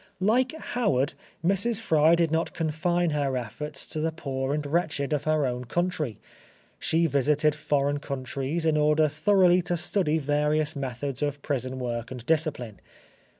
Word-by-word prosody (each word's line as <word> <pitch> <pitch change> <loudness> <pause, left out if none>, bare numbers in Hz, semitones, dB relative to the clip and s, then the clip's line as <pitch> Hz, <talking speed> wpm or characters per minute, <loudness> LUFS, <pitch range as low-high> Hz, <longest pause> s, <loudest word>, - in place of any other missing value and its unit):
Like 245 +7 +2
Howard, 190 - 0 0.3
Mrs. 200 +5 +2
Fry 160 -6 +4
did 170 -2 +1
not 165 +1 -1
confine 170 +2 0
her 140 -3 0
efforts 135 +5 -5
to 155 - -4
the 160 +1 0
poor 135 -4 -3
and 150 0 -1
wretched 145 -2 -1
of 145 -1 -1
her 155 -2 +2
own 125 0 -3
country. 155 - -1 0.6
She 165 +1 +1
visited 150 +1 +2
foreign 145 -1 0
countries 140 +3 -3
in 155 -1 +3
order 150 +1 +4
thoroughly 180 +4 +4
to 175 0 -1
study 160 -2 +1
various 150 +1 +1
methods 135 0 -4
of 145 -1 -2
prison 130 -2 -2
work 120 -2 -3
and 125 -2 -8
discipline. 145 -8 -1
150 Hz, 150 wpm, -26 LUFS, 140-165 Hz, 0.6 s, Fry